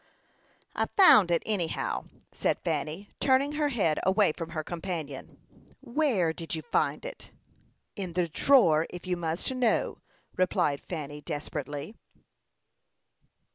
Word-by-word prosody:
"I -, -, 0 dB
found 290 Hz, -, +8 dB
it, 170 Hz, -1 st, +2 dB
anyhow," 185 Hz, -7 st, -2 dB, 0.3 s
said -, -, 0 dB
Fanny, 175 Hz, +7 st, -3 dB
turning 270 Hz, +2 st, +3 dB
her 300 Hz, 0 st, 0 dB
head 195 Hz, -, +1 dB
away 190 Hz, -1 st, +3 dB
from 165 Hz, +1 st, -6 dB
her 155 Hz, -1 st, -4 dB
companion. 165 Hz, -5 st, -6 dB, 0.4 s
"Where 240 Hz, -, +1 dB
did 165 Hz, 0 st, -4 dB
you 160 Hz, -, -5 dB
find 235 Hz, -, 0 dB
it?" -, -, -8 dB, 0.7 s
"In 185 Hz, -4 st, -5 dB
the 175 Hz, 0 st, +1 dB
drawer, 165 Hz, -, +4 dB
if 180 Hz, +1 st, -9 dB
you 180 Hz, -1 st, 0 dB
must 170 Hz, +7 st, -3 dB
know," 250 Hz, -3 st, +1 dB, 0.4 s
replied 150 Hz, -6 st, +1 dB
Fanny, 150 Hz, -4 st, -6 dB
desperately. 145 Hz, +3 st, -5 dB
175 Hz, 125 wpm, -28 LUFS, 160-225 Hz, 0.7 s, found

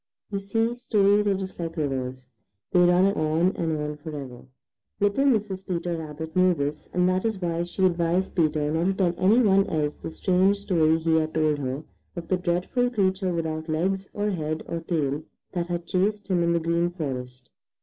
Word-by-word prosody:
You 200 Hz, -, -1 dB
see 225 Hz, +4 st, 0 dB
stories 210 Hz, -4 st, +2 dB
are 200 Hz, -, +3 dB
just 190 Hz, -1 st, -6 dB
like 165 Hz, -1 st, -4 dB
rivers, 130 Hz, -3 st, -3 dB, 0.5 s
they -, -, +4 dB
run 180 Hz, +1 st, +5 dB
on 160 Hz, +2 st, +1 dB
and 160 Hz, -2 st, -1 dB
on 150 Hz, 0 st, -4 dB
forever. 140 Hz, -6 st, -8 dB, 0.5 s
Little 205 Hz, +7 st, +2 dB
Mrs. 210 Hz, -7 st, 0 dB
Peter 175 Hz, -1 st, -2 dB
Rabbit 160 Hz, 0 st, -7 dB
knew 185 Hz, -1 st, +4 dB
this, 145 Hz, 0 st, -4 dB
and 180 Hz, 0 st, +2 dB
that 185 Hz, 0 st, +1 dB
is 220 Hz, -4 st, -1 dB
why 170 Hz, -2 st, -1 dB
she 190 Hz, +2 st, 0 dB
advised 175 Hz, +1 st, +1 dB
Peter 155 Hz, -3 st, +1 dB
not 165 Hz, +2 st, 0 dB
to 195 Hz, -, +2 dB
tell 180 Hz, -3 st, +1 dB
any 210 Hz, +7 st, +5 dB
one 195 Hz, -2 st, +4 dB
else 150 Hz, -2 st, -1 dB
the -, -, -6 dB
strange 190 Hz, +4 st, +2 dB
story 165 Hz, -5 st, +2 dB
he 160 Hz, 0 st, +2 dB
had 155 Hz, 0 st, -1 dB
told 155 Hz, -2 st, +2 dB
her 135 Hz, +2 st, -3 dB, 0.3 s
of 170 Hz, -2 st, -7 dB
the 185 Hz, -, +2 dB
dreadful 180 Hz, +8 st, 0 dB
creature 190 Hz, -4 st, 0 dB
without 160 Hz, -1 st, -3 dB
legs 190 Hz, +5 st, -1 dB
or 210 Hz, 0 st, -1 dB
head 155 Hz, -3 st, -3 dB
or 170 Hz, -, -3 dB
tail 155 Hz, -4 st, -1 dB, 0.3 s
that 175 Hz, -2 st, -2 dB
had 175 Hz, -1 st, -3 dB
chased 205 Hz, +3 st, 0 dB
him 180 Hz, -2 st, +2 dB
in 170 Hz, 0 st, +2 dB
the 170 Hz, -, +2 dB
Green 170 Hz, +1 st, +1 dB
Forest. 130 Hz, -7 st, -6 dB
175 Hz, 190 wpm, -25 LUFS, 155-190 Hz, 0.5 s, run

